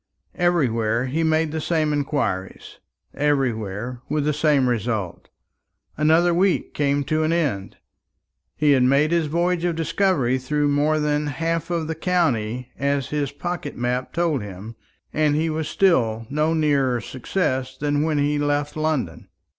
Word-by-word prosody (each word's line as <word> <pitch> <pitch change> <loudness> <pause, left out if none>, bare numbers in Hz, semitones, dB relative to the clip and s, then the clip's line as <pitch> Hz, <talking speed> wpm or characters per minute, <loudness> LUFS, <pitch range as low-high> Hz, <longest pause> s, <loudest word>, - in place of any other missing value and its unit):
Everywhere 120 -10 +1
he 140 +6 -1
made 160 -1 +1
the 160 0 -3
same 155 -2 0
inquiries, 140 -10 -3 0.3
everywhere 125 -5 -1
with 150 0 0
the 150 - +1
same 145 -3 +2
result. 110 -6 -2 0.7
Another 160 +3 +3
week 185 +2 +1
came 145 -1 +1
to 155 +3 0
an 155 +1 +1
end. 140 - -1 0.8
He 150 -1 +3
had 135 -2 +4
made 140 +5 +3
his 170 -2 +2
voyage 170 +2 0
of 175 -2 0
discovery 165 -6 +1
through 145 +3 0
more 150 +2 +2
than 150 0 0
half 165 +4 -2
of 170 -2 -1
the 160 - -3
county, 125 -9 -1
as 140 -1 0
his 145 -2 -1
pocket 150 +1 -5
map 125 +1 -2
told 165 -6 0
him, 105 +3 -8 0.4
and 150 -1 +2 0.2
was 155 -1 -2
still 115 - +2
no 155 +3 +1
nearer 140 -5 +2
success 130 - -2
than 145 +1 0
when 155 -1 0
he 145 +1 +1
left 145 0 -1
London. 155 - -2
145 Hz, 145 wpm, -23 LUFS, 130-160 Hz, 0.8 s, had